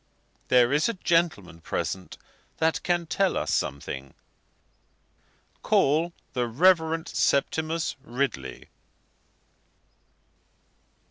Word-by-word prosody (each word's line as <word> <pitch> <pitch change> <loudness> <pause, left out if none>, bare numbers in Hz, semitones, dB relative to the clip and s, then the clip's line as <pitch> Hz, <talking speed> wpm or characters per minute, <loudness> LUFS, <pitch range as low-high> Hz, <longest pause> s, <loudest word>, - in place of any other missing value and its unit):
There 125 +1 +4
is 150 +8 +2
a 230 - -2
gentleman 165 - 0
present 95 +2 -4 0.4
that 160 0 +1
can 175 -1 0
tell 190 +3 +1
us - - -1
something. 70 -1 -3 1.5
Call 160 +5 +2 0.2
the 125 -2 0
Reverend 160 +4 +3
Septimus 160 +3 0
Ridley." 120 - -3
150 Hz, 80 wpm, -26 LUFS, 115-165 Hz, 1.5 s, There